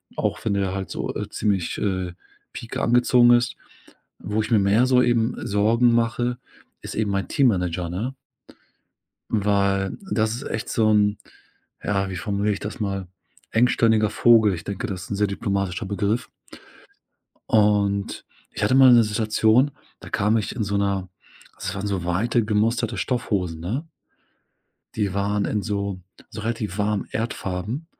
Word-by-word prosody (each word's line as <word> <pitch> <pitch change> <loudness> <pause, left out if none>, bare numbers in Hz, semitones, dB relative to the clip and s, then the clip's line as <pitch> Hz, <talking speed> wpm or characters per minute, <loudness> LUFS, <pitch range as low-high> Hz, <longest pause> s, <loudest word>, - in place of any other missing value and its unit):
Auch 105 -1 -2
wenn 105 - +1
der 100 -2 0
halt 95 -1 -5
so, - - -3
äh, - - -3
ziemlich, 95 -5 -1
äh, 95 -3 -2 0.4
pieke - - -5
angezogen 120 0 +5
ist. 120 0 +3 0.6
Wo 105 +3 -2
ich 110 - -6
mir 115 - +5
mehr 100 +5 +3
so 130 -1 +4
eben 120 -1 +1
Sorgen 115 +4 +3
mache, 120 +1 0 0.4
ist - - -7
eben 105 -2 0
mein 100 -2 -1
Teammanager, 90 -9 +1
ne? 110 +10 -3 1.2
Weil 100 -2 +1
das 110 -5 +1
ist 125 - -7
echt 110 - -3
so 110 -1 +2
'n 105 -1 +3 0.6
ja, 100 -1 0
wie 95 - -5
formuliere 100 +4 -1
ich - - -7
das 105 - -6
mal? 100 -3 -3 0.4
Engstirniger 115 -2 +3
Vogel. 110 -4 +5
Ich 85 - -7
denke, 100 +5 -4
das 95 -5 -5
ist - - -13
'n 100 - -2
sehr 105 +1 +2
diplomatischer 100 0 -2
Begriff. 100 +4 -1 1.2
Und 100 -2 +2 0.3
ich - - -6
hatte - - +3
mal 130 -1 +8
'ne 120 -1 +7
Situation, 110 +4 +2 0.3
da - - -11
kam 105 +2 +2
ich 105 -2 -2
in 115 -4 -2
so 100 0 -1
'ner 100 -2 -1 0.5
das 95 - -4
waren 100 +1 -3
so 95 -4 -2
weite 110 +7 +1
gemusterte 110 +2 0
Stoffhosen, 90 -5 -2
ne? 120 - -3 1.1
Die 100 -4 -1
waren 100 +1 0
in 105 - -1
so 100 -3 -3 0.3
so 105 - -7
relativ 110 -3 -3
warmen 105 0 0
Erdfarben, 110 - -4
105 Hz, 155 wpm, -23 LUFS, 100-115 Hz, 1.2 s, mal